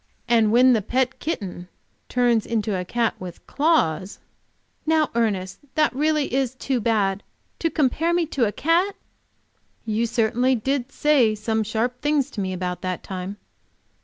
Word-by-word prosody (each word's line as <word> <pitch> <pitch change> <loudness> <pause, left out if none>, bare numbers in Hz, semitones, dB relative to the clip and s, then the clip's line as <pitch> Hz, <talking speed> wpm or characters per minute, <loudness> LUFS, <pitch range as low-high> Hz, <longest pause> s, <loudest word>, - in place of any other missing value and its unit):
And 225 -3 +4
when 250 +2 +6
the 220 - +2
pet 255 +4 -1
kitten 185 - -4 0.4
turns 240 -3 +2
into 220 -3 -1
a 180 - -2
cat 230 +5 0
with 180 -2 -9
claws." 205 - +1 0.7
"Now, 315 -1 +2
Ernest, 200 -5 -1 0.2
that 305 -1 +3
is 260 - -7
really 295 -3 +1
too 260 -1 -1
bad! 205 -4 +1 0.4
To 330 - +1
compare 315 +2 +1
me 345 -1 +2
to 270 -7 0
a - - -2
cat!" 345 - +1 0.9
"You 225 +1 0
certainly 240 +2 +2
did 265 +3 -2
say 270 -9 +3
some 220 +1 -1
sharp 230 +4 -2
things 290 -2 +1
to 205 - -4
me 190 -1 -2
about 180 -1 -3
that 185 -2 -3
time." 190 +1 -6
235 Hz, 155 wpm, -23 LUFS, 205-280 Hz, 0.9 s, when